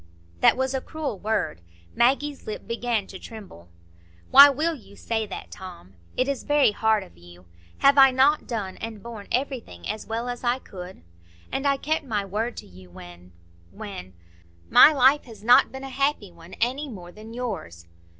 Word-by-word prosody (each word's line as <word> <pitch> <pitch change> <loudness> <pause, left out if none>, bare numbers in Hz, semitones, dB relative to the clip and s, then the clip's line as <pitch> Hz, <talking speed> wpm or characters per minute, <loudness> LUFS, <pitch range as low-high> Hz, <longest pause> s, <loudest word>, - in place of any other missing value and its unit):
That - - +5
was 260 0 -1
a 265 - -2
cruel 295 - -5
word. 210 - -2 0.3
Maggie's 275 +4 +1
lip 215 - -6
began 230 -2 -1
to 190 -1 -11
tremble. 195 - -12 0.6
"Why 285 +1 +10
will 310 +5 0
you 220 -8 -14
say 220 0 -3
that, 195 - -8
Tom? 175 - -11 0.2
It 255 - +1
is 280 -2 -2
very 290 -6 +3
hard 220 0 +1
of 85 0 -18
you. 85 +1 -16 0.4
Have 280 0 +6
I 270 0 +9
not 270 +4 +2
done 205 -6 -4
and 220 -3 -7
borne 230 -4 -9
everything 250 - -3
as 215 - -5
well 230 +2 -3
as 245 0 -5
I 240 +1 +1
could? 180 - -11 0.5
And 275 +1 -1
I 275 -1 +2
kept 310 +3 -1
my 215 -7 -2
word 220 +5 -3
to - - -8
you—when—when——My 85 - -2
life 275 0 +4
has 225 -4 -13
not 245 +2 +5
been 265 +1 -8
a 270 - -6
happy 275 -7 -1
one, 170 +1 -15
any 265 +6 -1
more 180 -7 -10
than 220 +4 -12
yours." 160 - -6
220 Hz, 170 wpm, -24 LUFS, 175-265 Hz, 0.6 s, Why